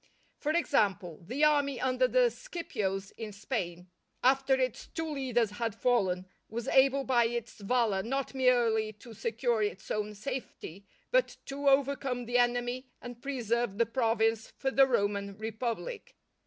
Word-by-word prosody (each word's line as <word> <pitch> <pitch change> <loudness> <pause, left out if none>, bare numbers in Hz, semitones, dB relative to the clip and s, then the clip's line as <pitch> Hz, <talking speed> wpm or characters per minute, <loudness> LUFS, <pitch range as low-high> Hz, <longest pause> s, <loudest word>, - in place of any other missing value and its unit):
For 300 - 0
example, 205 - +1
the 265 +7 -1
army 285 -4 +3
under 255 0 +2
the - - +4
Scipios 200 - -4
in 220 -2 -5
Spain, 185 -5 -4 0.3
after 265 +1 +4
its 255 -3 -2
two 325 0 -4
leaders 255 -7 0
had 225 0 -3
fallen, 195 -7 +1 0.2
was 235 +3 -4
able 270 +1 +4
by 245 -3 +3
its 235 -1 -4
valour 215 -2 +1
not 270 +6 -2
merely 235 -4 +2
to 220 +3 -13
secure 230 +1 0
its 195 -3 -3
own 210 0 -2
safety, 200 - -6 0.2
but - - +2
to 280 +1 0
overcome 270 -2 +1
the 245 +1 +2
enemy 245 +1 0
and 245 -1 -9
preserve 240 -5 -1
the 230 - +4
province 225 -1 +1
for 265 - -1
the 270 0 +6
Roman 200 -4 0
Republic. 230 - -4
240 Hz, 145 wpm, -30 LUFS, 215-265 Hz, 0.3 s, the